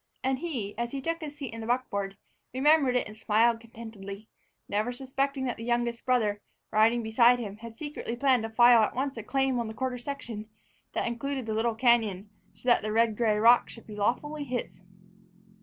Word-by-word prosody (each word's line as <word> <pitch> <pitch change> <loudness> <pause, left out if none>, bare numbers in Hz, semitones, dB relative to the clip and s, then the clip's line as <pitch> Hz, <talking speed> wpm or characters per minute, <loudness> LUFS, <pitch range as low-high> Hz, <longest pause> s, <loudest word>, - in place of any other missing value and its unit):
And 265 0 0
he, 250 -12 -3
as 235 +1 -2
he 275 - -2
took 330 +5 -3
his 295 -2 -7
seat 270 -6 -6
in 230 - -6
the 220 - -6
buckboard, 200 -6 -1 0.4
remembered 275 -1 +4
it 250 - +1
and 210 - -10
smiled 225 +1 +2
contentedly, 220 -3 -10 0.4
never 210 +4 -1
suspecting 270 +2 -2
that 245 - -2
the 230 - -7
youngest 240 0 -1
brother, 215 -5 +1 0.3
riding 225 +2 +3
beside 235 +2 +5
him, 210 -4 -6
had 225 0 -10
secretly 290 -5 -5
planned 255 -1 +3
to 225 - -4
file 240 +1 +6
at 215 - 0
once 270 +2 -2
a - - -3
claim 270 +2 0
on 235 - -2
the 220 - -7
quarter 255 -1 -2
section 235 -5 -6 0.4
that - - -1
included 260 +2 -3
the 220 - -2
little 225 +1 0
cañon 220 -5 +2 0.3
so - - -13
that 240 - +5
the 215 - -3
red 225 0 +2
gray 215 -2 +2
rock 235 +3 +5
should 230 - -11
be 210 - -9
lawfully 290 +8 -1
his. 250 -7 -5
235 Hz, 200 wpm, -28 LUFS, 220-260 Hz, 0.4 s, file